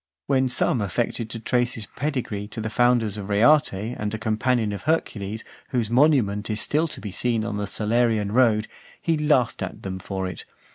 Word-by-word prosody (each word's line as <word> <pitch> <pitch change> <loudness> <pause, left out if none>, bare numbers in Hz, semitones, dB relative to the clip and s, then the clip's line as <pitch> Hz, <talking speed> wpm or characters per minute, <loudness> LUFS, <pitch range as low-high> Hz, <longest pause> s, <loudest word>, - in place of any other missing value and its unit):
When 130 -1 +2
some 125 -1 +2
affected 110 +3 -2
to 115 - -5
trace 120 +2 +1
his 110 - -6
pedigree 120 -5 -3
to 110 - -8
the 110 0 -3
founders 120 -4 +2
of 100 -1 -6
Reate, 130 +9 +5
and 105 +1 -4
a 110 - -3
companion 110 +1 0
of 100 - -5
Hercules, 110 -8 -1 0.3
whose 120 -4 -1
monument 120 -7 +3
is 110 0 -1
still 155 +3 +1
to - - -8
be 105 - -6
seen 115 +2 0
on 105 -3 -3
the 105 0 -2
Salarian 110 0 +1
road, 110 -3 +3 0.3
he 165 - +1
laughed 150 -6 +2
at - - -5
them 95 -1 -4
for 95 0 -4
it. 90 - -6
110 Hz, 190 wpm, -24 LUFS, 105-125 Hz, 0.3 s, Reate